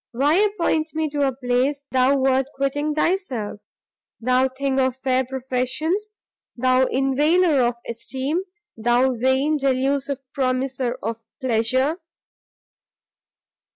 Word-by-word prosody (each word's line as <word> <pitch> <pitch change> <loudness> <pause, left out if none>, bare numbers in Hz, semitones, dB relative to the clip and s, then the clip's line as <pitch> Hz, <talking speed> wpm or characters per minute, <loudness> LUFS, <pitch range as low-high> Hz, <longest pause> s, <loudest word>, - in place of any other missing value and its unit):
why 280 +5 +2
appoint 345 -5 +1
me 315 0 0
to 290 -1 -3
a 275 -1 +3
place 260 +3 0
thou 260 +2 +3
wert 265 0 +2
quitting 290 +2 -1
thyself? 280 - -1 0.6
thou 255 +2 +2
thing 270 +1 -1
of 260 -1 +1
fair 260 0 +1
professions! 265 - -2 0.4
thou 255 +1 +3
inveigler 290 +4 +3
of 240 0 +1
esteem! 265 +8 -3 0.3
thou 240 +3 +2
vain, 260 +5 +1
delusive 275 0 0 0.2
promiser 255 -1 -1
of 225 0 -3 0.2
pleasure!" 260 +5 +1
265 Hz, 110 wpm, -22 LUFS, 255-290 Hz, 0.6 s, a